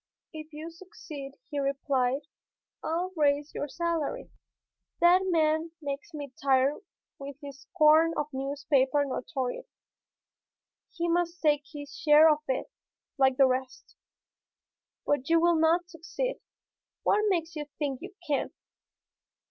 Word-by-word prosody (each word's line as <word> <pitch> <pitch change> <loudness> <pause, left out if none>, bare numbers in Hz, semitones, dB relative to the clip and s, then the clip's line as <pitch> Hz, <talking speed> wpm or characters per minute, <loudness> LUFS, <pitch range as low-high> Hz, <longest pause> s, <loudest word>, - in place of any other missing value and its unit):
"If 310 0 -9
you 315 +2 -7
succeed," 305 -6 -10 0.2
he 290 - -2
replied, 275 -1 0 0.6
"I'll 345 +3 -1
raise 290 -1 +1
your 290 - -3
salary. 335 - -3 0.7
That 350 +2 +6
man 320 -1 +1
makes 290 +3 -5
me 290 -4 -7
tired 270 +1 +3 0.4
with 280 0 -7
his 280 -1 -10
scorn 315 +2 +5
of 295 - 0
newspaper 275 0 +1
notoriety. 260 - -4 1.2
He 345 -1 -2
must 345 0 0
take 295 -2 +2
his 290 -2 -9
share 310 0 +6
of 300 - -5
it, 260 - -2 0.5
like 265 -1 +4
the 270 - +7
rest. 255 0 -3 1.1
But 290 0 0
you 330 0 +5
will 340 -1 +3
not 335 +2 +3
succeed. 355 +10 -4 0.6
What 420 - +3
makes 335 -3 -1
you 300 -1 -4
think 280 -4 -2
you 385 +2 -9
can?" 285 -4 -1
300 Hz, 125 wpm, -28 LUFS, 275-335 Hz, 1.2 s, the